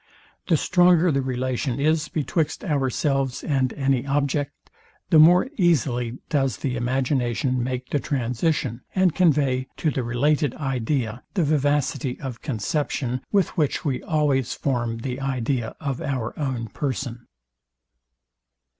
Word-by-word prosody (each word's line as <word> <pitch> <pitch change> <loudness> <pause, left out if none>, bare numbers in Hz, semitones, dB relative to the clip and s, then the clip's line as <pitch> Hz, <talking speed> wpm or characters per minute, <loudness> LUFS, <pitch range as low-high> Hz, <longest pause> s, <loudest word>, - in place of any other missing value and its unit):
The 165 - +4
stronger 175 +1 +4
the 135 -1 +1
relation 130 0 -2
is 155 +1 +2
betwixt 155 +3 -1
ourselves 135 - 0
and 135 -4 +1
any 135 -3 +1
object, 140 0 -1 0.4
the 160 - +7
more 175 +7 +7
easily 130 - +1
does 135 -8 0
the 130 -3 -2
imagination 125 0 0
make 125 0 -4
the 145 - +2
transition, 125 0 -1
and 185 -3 +3
convey 140 -7 +2
to 155 - +1
the 130 - -1
related 135 +3 +1
idea 130 -3 -2
the 180 - +2
vivacity 145 -3 0
of 130 -4 -6
conception, 130 0 -2
with 195 -3 +3
which 150 -1 0
we 135 -4 -1
always 145 -5 +1
form 120 -4 -1
the 125 +2 -4
idea 130 -3 -1
of 140 -4 -3
our 130 -5 -2
own 130 -6 -2
person. 125 -3 -4
135 Hz, 130 wpm, -24 LUFS, 125-150 Hz, 0.4 s, the